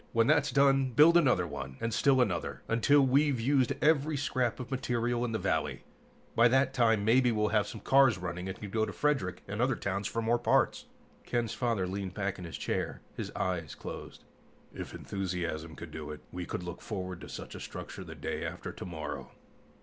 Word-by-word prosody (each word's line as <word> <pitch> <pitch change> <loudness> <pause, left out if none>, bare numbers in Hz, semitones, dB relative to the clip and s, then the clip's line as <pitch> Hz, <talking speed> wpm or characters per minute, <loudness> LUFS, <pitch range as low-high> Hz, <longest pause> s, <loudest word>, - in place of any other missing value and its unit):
When 115 -1 +4
that's 150 +1 +3
done, 135 -2 +3
build 155 +7 +7
another 125 - +4
one, 70 -4 -6
and 115 0 -2
still 135 -2 +4
another, 90 -8 -1
until 140 +6 +4
we've 135 0 +3
used 130 +1 +2
every 150 -1 +3
scrap 130 -4 0
of 125 +1 -7
material 120 -2 0
available 120 - 0
in 120 - -3
the - - +1
valley. - - -1 0.5
By 115 +1 +6
that 130 +2 +3
time 115 -5 +3
maybe 125 +2 +4
we'll 105 -1 +1
have 105 -2 +2
some - - -8
cars 135 -5 +5
running 90 +1 -4
and 95 - -6
can 105 -2 -7
go 110 0 +1
to - - -2
Frederick 130 - 0
and 100 +3 -3
other 130 +1 +2
towns 100 -1 -2
for 115 - -3
more 120 +2 +2
parts." 120 - +2 0.4
Ken's 120 -2 -1
father 115 -7 0
leaned 95 0 -4
back 100 -2 -2
in 90 - -6
his 85 - -6
chair, - - -2
his - - -4
eyes 85 -4 -2
closed. - - -8 0.5
"If - - -7
enthusiasm 85 -5 -4
could 85 -2 -9
do 75 -1 -6
it, 75 - -7
we 90 -1 -5
could 90 - -4
look 90 0 -7
forward 95 -4 -5
to - - -9
such - - -7
a - - -7
structure - - -7
the - - -9
day - - -4
after - - -5
tomorrow." 75 -6 -6
115 Hz, 205 wpm, -31 LUFS, 90-130 Hz, 0.5 s, build